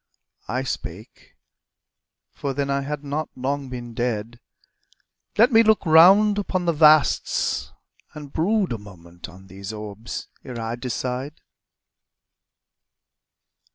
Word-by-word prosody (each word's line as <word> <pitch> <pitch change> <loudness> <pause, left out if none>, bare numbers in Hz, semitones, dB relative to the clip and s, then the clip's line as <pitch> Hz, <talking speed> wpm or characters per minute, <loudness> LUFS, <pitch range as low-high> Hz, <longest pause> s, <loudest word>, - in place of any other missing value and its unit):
I 130 +2 -2
spake 105 -5 -7 1.0
for 140 -2 -4
then 140 0 -1
I 140 0 0
had 145 +1 -5
not 145 +2 -3
long 135 +1 -3
been 120 -2 -7
dead 120 -1 -3 1.0
"Let 235 +5 +5
me 225 -1 +7
look 220 -3 +3
round 195 +6 +6
upon 185 -3 -2
the 170 - +2
vasts, 155 -1 +3 0.4
and 145 -2 -10
brood 195 - +1
A 115 - -5
moment 85 -4 -12
on 95 +1 -15
these 95 +2 -8
orbs 105 +1 -7 0.2
ere 125 -3 -7
I 115 +1 -3
decide 125 +3 -4
135 Hz, 120 wpm, -23 LUFS, 115-155 Hz, 1.0 s, me